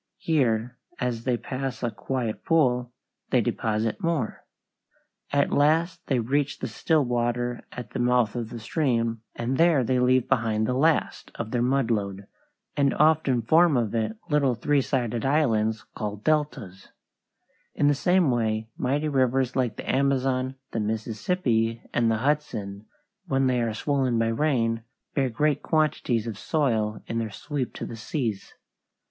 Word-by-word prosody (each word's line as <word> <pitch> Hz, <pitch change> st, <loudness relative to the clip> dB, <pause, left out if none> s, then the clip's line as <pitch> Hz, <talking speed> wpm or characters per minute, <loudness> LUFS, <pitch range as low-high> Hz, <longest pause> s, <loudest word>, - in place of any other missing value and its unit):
Here, 125 Hz, -5 st, 0 dB, 0.2 s
as 120 Hz, -2 st, -2 dB
they 125 Hz, -2 st, +1 dB
pass 130 Hz, +1 st, -5 dB
a 120 Hz, -, 0 dB
quiet 110 Hz, +2 st, -3 dB
pool, 125 Hz, -7 st, +2 dB, 0.4 s
they -, -, +3 dB
deposit 110 Hz, -, -1 dB
more. 165 Hz, -, -1 dB, 0.9 s
At 140 Hz, 0 st, +2 dB
last 160 Hz, +4 st, +2 dB
they 135 Hz, -, +2 dB
reach 135 Hz, +5 st, 0 dB
the -, -, -4 dB
still 155 Hz, -4 st, +1 dB
water 120 Hz, 0 st, -1 dB
at 125 Hz, -, -8 dB
the -, -, -4 dB
mouth 125 Hz, -3 st, +2 dB
of 115 Hz, -2 st, -3 dB
the 120 Hz, -, -7 dB
stream, 115 Hz, -3 st, 0 dB
and 125 Hz, +3 st, -2 dB
there 165 Hz, -5 st, +5 dB
they 125 Hz, +1 st, +1 dB
leave 125 Hz, 0 st, +3 dB
behind 110 Hz, -4 st, +1 dB
the 125 Hz, -, 0 dB
last 155 Hz, +5 st, +1 dB
of 115 Hz, -1 st, -5 dB
their 120 Hz, -, 0 dB
mud 125 Hz, -1 st, +1 dB
load, 100 Hz, -2 st, -2 dB, 0.5 s
and 140 Hz, -1 st, +2 dB
often 150 Hz, -6 st, +3 dB
form 160 Hz, +3 st, +4 dB
of 115 Hz, -3 st, -1 dB
it 110 Hz, -1 st, -1 dB
little 140 Hz, -4 st, +2 dB
three 145 Hz, +4 st, +2 dB
sided 120 Hz, -4 st, -1 dB
islands 110 Hz, -7 st, +1 dB
called 105 Hz, -1 st, -5 dB
deltas. 140 Hz, -11 st, -1 dB, 0.9 s
In 145 Hz, -, +2 dB
the 145 Hz, -, +5 dB
same 175 Hz, +1 st, +3 dB
way 110 Hz, -2 st, -1 dB
mighty 145 Hz, +4 st, 0 dB
rivers 130 Hz, -2 st, +1 dB
like 125 Hz, -4 st, 0 dB
the -, -, -8 dB
Amazon, 130 Hz, -1 st, +1 dB, 0.2 s
the 115 Hz, -, -2 dB
Mississippi, 115 Hz, -, -1 dB
and 115 Hz, -1 st, +2 dB
the 110 Hz, -, +2 dB
Hudson, 110 Hz, -7 st, -2 dB, 0.4 s
when 135 Hz, -3 st, +1 dB
they 125 Hz, -2 st, +2 dB
are 115 Hz, -2 st, -1 dB
swollen 130 Hz, -1 st, 0 dB
by 115 Hz, 0 st, +2 dB
rain, 115 Hz, -3 st, +1 dB, 0.3 s
bear 135 Hz, -2 st, +1 dB
great 145 Hz, +5 st, +1 dB
quantities 150 Hz, -8 st, +1 dB
of 110 Hz, -3 st, -5 dB
soil 110 Hz, -8 st, 0 dB
in 115 Hz, -, -2 dB
their 115 Hz, -1 st, -2 dB
sweep 140 Hz, +4 st, -4 dB
to -, -, -5 dB
the 115 Hz, -, -7 dB
seas. 110 Hz, -2 st, -4 dB
125 Hz, 155 wpm, -26 LUFS, 115-140 Hz, 0.9 s, there